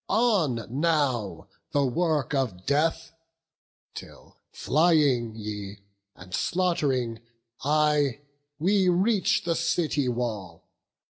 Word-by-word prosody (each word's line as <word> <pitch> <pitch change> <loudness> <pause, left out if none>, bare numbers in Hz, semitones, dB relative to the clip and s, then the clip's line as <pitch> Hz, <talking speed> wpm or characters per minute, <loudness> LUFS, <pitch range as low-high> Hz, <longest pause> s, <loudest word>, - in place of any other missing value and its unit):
On 175 - +2
now 135 - -1 0.3
the 145 -1 +2
work 150 0 0
of 110 -10 -2
death! 150 +3 0 0.8
till, - - -12 0.2
flying 145 -8 +2
ye, 105 -2 -7 0.3
And 90 +1 -13
slaught'ring 140 - 0 0.4
I, 150 -2 +2 0.4
we 190 +4 +2
reach 190 +3 +2
the 170 - 0
city 165 -4 0
wall. 110 -8 -4
145 Hz, 90 wpm, -26 LUFS, 115-165 Hz, 0.8 s, On